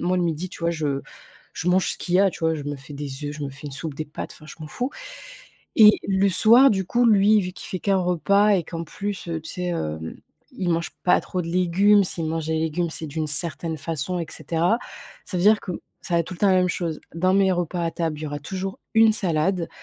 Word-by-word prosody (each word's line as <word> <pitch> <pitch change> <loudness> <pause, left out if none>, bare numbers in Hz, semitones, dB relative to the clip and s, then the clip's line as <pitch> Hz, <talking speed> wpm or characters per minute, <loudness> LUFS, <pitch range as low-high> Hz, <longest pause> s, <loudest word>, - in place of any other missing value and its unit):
Moi, 180 +1 +1
le 180 - +1
midi, 170 +2 -2
tu 175 - -12
vois, 170 - +1
je 150 -4 -2 0.5
je 175 - -2
mange 185 +1 +3
ce - - -8
qu'il 175 - -3
y - - +5
a, 195 -1 +4
tu - - -11
vois. 160 0 +1
Je 150 - -5
me 145 0 -4
fais 140 +2 -12
des 140 0 -6
œufs, 145 +1 -4
je 150 - -7
me 140 - -3
fais 140 +2 -11
une 140 - -7
soupe, 150 +2 -6
des 155 +2 -4
pâtes 150 - -7
enfin 155 - -15
je 155 - -10
m'en 155 - -6
fous. 250 - -3 0.9
Et 215 -1 +10 0.2
le 195 0 +3
soir, 230 +8 +6
du 190 -2 0
coup, 240 +6 +1
lui, 210 0 +5
vu 180 -1 -4
qu'il - - -10
fait 185 - -3
qu'1 195 0 +1
repas 200 +4 +2
et 185 -4 +2
qu'en 165 +1 -5
plus, 200 +2 -5
heu, 165 -1 -3
tu 155 - -8
sais, 180 -1 -3
heu, 80 - -4 0.4
il 180 -2 -3
mange 165 0 -1
pas 180 - +4
trop 180 -1 -4
de - - -7
légumes. 185 +4 +4
S'il 175 -3 -3
mange 160 0 -2
des 160 0 0
légumes, 160 +1 -1
c'est 160 - -4
d'une 155 +1 -3
certaine 160 +1 -1
façon, 165 +3 -3
et 165 - -3
cetera. 175 +8 0 0.5
Ça 185 - -4
veut 175 - 0
dire 215 0 +6
que - - -7 0.3
ça 175 - -3
va 170 - +4
être 165 - -3
tout 185 - -6
le 170 - -13
temps 205 - +3
la 190 - +4
même 180 0 +3
chose. 165 -3 -3 0.2
Dans 185 +3 +2
mes 195 -1 +4
repas 175 0 -2
à 165 - 0
table, 160 -3 -3
il - - -8
y 155 - -3
aura 145 0 -4
toujours 190 +5 -5 0.2
une 225 0 +6
salade, 180 -2 0
175 Hz, 265 wpm, -23 LUFS, 155-190 Hz, 0.9 s, Et